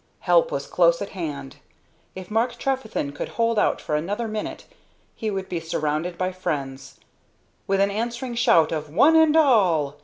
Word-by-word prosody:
Help 175 -2 +3
was 140 0 -3
close 170 -1 +3
at 200 - -5
hand. 145 -7 -6 0.6
If 185 +1 -9
Mark 235 +2 0
Trefethen 240 - -2
could 145 - -6
hold 230 -1 0
out - - +1
for 150 - -3
another 205 +9 -2
minute 215 -1 -5 0.5
he 220 - -3
would 195 -2 -4
be 175 - -3
surrounded 160 +1 -2
by 185 0 -1
friends. 140 -7 -5 0.7
With 195 0 +1
an 200 0 +2
answering 235 +4 -3
shout 230 -9 +3
of 155 -2 -4
"One 265 - +4
and 320 -1 +5
all!" 180 - +3
190 Hz, 165 wpm, -23 LUFS, 155-230 Hz, 0.7 s, and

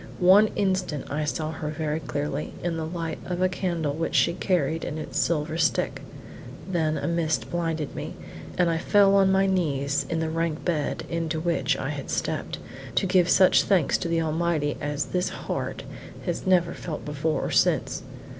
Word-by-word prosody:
One 190 +4 +7
instant 185 -9 -1
I 150 +1 -1
saw 155 +1 -2
her 155 -1 -4
very 155 0 -2
clearly, 145 -2 -3
in 170 -1 -1
the 160 -1 -3
light 165 -2 -4
of 180 -1 -3
a 185 - +4
candle 170 -5 -1
which 165 +2 -2
she 170 - +4
carried 165 -4 0
in 150 - -4
its 155 - -3
silver 155 0 0
stick; 160 - +1 0.7
then 160 -4 0
a - - -2
mist 170 -2 0
blinded 165 -3 -2
me, - - -6 0.4
and 180 -1 +4
I 165 -1 +1
fell 200 +2 +4
on 195 -1 +5
my 190 0 +4
knees 140 -7 0
in 165 - 0
the 160 - 0
rank 165 -1 -2
bed 160 -5 -1
into 165 -1 -2
which 170 +1 +1
I - - -3
had - - -5
stepped, - - -2 0.4
to - - +2
give 180 -2 +3
such 185 0 +6
thanks 185 -7 +2
to 175 - -2
the 165 -1 +1
Almighty 160 -2 0
as 145 -1 -1
this 180 0 -1
heart - - -4 0.4
has - - -3
never 180 -2 +3
felt 160 -3 -6
before 150 +2 -1
or - - -3
since. - - +2
165 Hz, 185 wpm, -26 LUFS, 155-180 Hz, 0.7 s, One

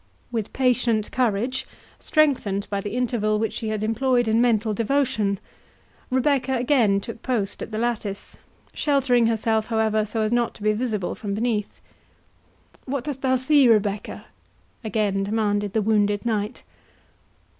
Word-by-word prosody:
With 225 -3 -3
patient 245 -4 +1
courage, 250 +2 0 0.3
strengthened 250 -10 +1
by 200 -1 -1
the 205 +3 -5
interval 230 -4 0
which 220 0 -1
she 225 - -4
had 215 -1 -2
employed 240 +2 +1
in 220 +1 +3
mental 225 -3 +2
devotion, 225 -4 0 0.7
Rebecca 265 0 +1
again 240 -6 +3
took 230 +3 -8
post 220 -6 -2
at - - -5
the 215 - -4
lattice, 220 -4 -3 0.4
sheltering 260 -5 +2
herself, 220 -1 0
however, 220 -1 +1
so 220 +1 -2
as 215 - -1
not 240 -1 +1
to 205 - -11
be 215 0 +3
visible 215 -5 -2
from 200 -2 -4
beneath. 215 -2 -2 1.1
"What 275 -1 -3
dost 280 -2 -5
thou 260 -1 +2
see, 265 +1 +4
Rebecca?" 210 -3 0 0.6
again 210 -2 0
demanded 205 -1 0
the 220 - +1
wounded 205 0 +1
knight. 215 -2 -2
225 Hz, 145 wpm, -23 LUFS, 210-250 Hz, 1.1 s, see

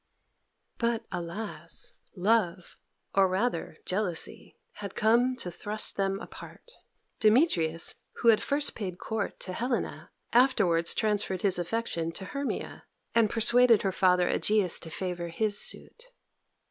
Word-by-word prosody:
But, 235 -1 0
alas! 170 -1 -4 0.2
love 185 -3 +1 0.4
or, 195 -1 +5
rather, 185 -4 -1
jealousy 185 -3 -3 0.2
had 200 -2 -6
come 240 +4 +3
to 180 -8 -6
thrust 210 +5 -3
them 195 0 0
apart. 485 - -10 0.5
Demetrius, 210 - +3 0.2
who 235 - +2
had 220 - +6
at - - -3
first 290 +1 0
paid 185 -5 -5
court 220 0 -4
to 185 - -4
Helena, 240 +4 -3 0.2
afterwards 185 -10 +3
transferred 205 -4 0
his 190 -3 +3
affection 175 -3 -2
to 190 - -6
Hermia, 280 +7 -4 0.3
and 230 -2 +4
persuaded 235 0 +5
her 195 - +1
father 180 -1 +3
Egeus 205 -5 +2
to 165 - -7
favour 175 0 -4
his 205 +5 0
suit. 475 - -2
205 Hz, 130 wpm, -29 LUFS, 180-230 Hz, 0.5 s, had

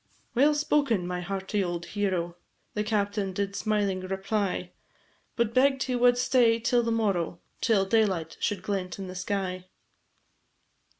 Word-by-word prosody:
"Well 290 +5 +4
spoken, 285 -10 +1
my 180 0 -3
hearty 195 +2 -2
old 175 -1 -3
hero," 185 -4 -1 0.4
The 210 - -1
captain 205 -2 -1
did 200 +1 -2
smiling 205 -3 0
reply, 190 -1 -2 0.6
But 235 -1 0
begg'd 270 +1 +3
he 255 - -1
wad 245 0 +4
stay 245 -2 +3
till 240 +1 +2
to 230 - -1
morrow, 195 -7 0 0.2
Till 210 -5 +3
daylight 190 -6 +1
should 205 -3 -1
glent 190 -3 -3
in 195 - -5
the 185 - -7
sky. 185 -1 -3
200 Hz, 140 wpm, -27 LUFS, 185-230 Hz, 0.6 s, Well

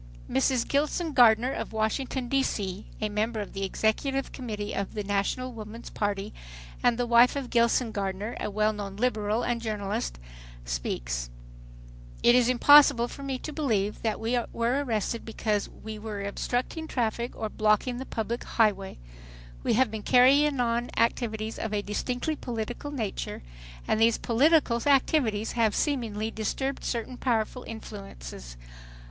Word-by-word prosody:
Mrs. 235 - +1
Gilson 305 +3 0
Gardner 240 0 +5
of - - -4
Washington, 245 +4 -1
D. 275 +2 +2
C., 200 -5 -3
a 215 - 0
member 215 +2 -1
of 205 - -6
the 195 - -5
Executive 260 +7 0
Committee 210 -5 -5
of 200 +2 -3
the 210 - -2
National 205 +6 -1
Woman's 225 +1 -9
party, 205 0 -2 0.5
and 240 -1 +3
the 245 - 0
wife 240 +2 +5
of 275 -3 -4
Gilson 235 0 +3
Gardner, 200 +2 -3
a - - -2
well 215 +1 +1
known 200 -2 -6
Liberal 215 -1 0
and 240 -1 -1
journalist, 200 - -3 0.5
speaks: - - -3 0.9
"It 240 - +7
is 245 -1 +4
impossible 255 -1 +7
for - - -9
me 270 -1 -3
to 305 +4 -7
believe 215 -10 0
that 220 -2 -1
we 235 +2 +1
were 240 +5 0
arrested 230 -2 -2
because 215 -2 -1
we 215 -1 -9
were 210 -2 -5
obstructing 245 +9 -2
traffic 235 -2 -2
or 220 - -3
blocking 215 +4 +1
the 265 - -5
public 230 +2 -3
high 220 -2 +3
way. 195 -1 -9 0.6
"We - - +1
have 250 -1 +3
been 220 -1 -4
carrying 275 +4 +5
on 240 0 0
activities 220 -1 0
of 215 -1 -2
a 205 - -1
distinctly 250 +8 -2
political 240 +2 -5
nature, 225 - -4 0.4
and - - +1
these 225 0 +4
political 255 -1 +3
activities 255 -6 +2
have 225 -3 +1
seemingly 225 -7 -1
disturbed 265 +6 -3
certain 240 +1 -3
powerful 240 0 0
influences. 65 - -9
225 Hz, 155 wpm, -27 LUFS, 210-250 Hz, 0.9 s, It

